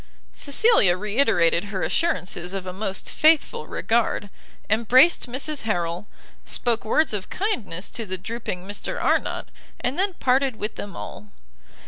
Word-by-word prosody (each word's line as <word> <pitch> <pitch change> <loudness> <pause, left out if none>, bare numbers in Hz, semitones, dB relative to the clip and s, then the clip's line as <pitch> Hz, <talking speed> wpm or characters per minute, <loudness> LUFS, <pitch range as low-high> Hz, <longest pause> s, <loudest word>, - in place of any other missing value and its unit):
Cecilia 280 - +4
re 210 +5 -3
iterated 170 -8 +3
her 195 -2 -4
assurances 185 - -1
of 190 -1 -4
a 185 - -5
most 195 0 -3
faithful 325 +9 +3
regard, 225 -3 0 0.4
embraced 250 +9 +4
Mrs 280 +4 -3
Harrel, 175 -3 -2 0.4
spoke 235 -2 -1
words 305 +4 +2
of 200 -3 -3
kindness 210 - -2
to 230 -3 -5
the 185 0 -3
drooping 190 -3 -5
Mr 205 0 -4
Arnott, - - 0 0.3
and 255 +7 -2
then 390 0 +1
parted 265 -4 +1
with 215 0 -4
them 205 - -7
all. 105 0 -8
215 Hz, 140 wpm, -24 LUFS, 185-275 Hz, 0.4 s, Cecilia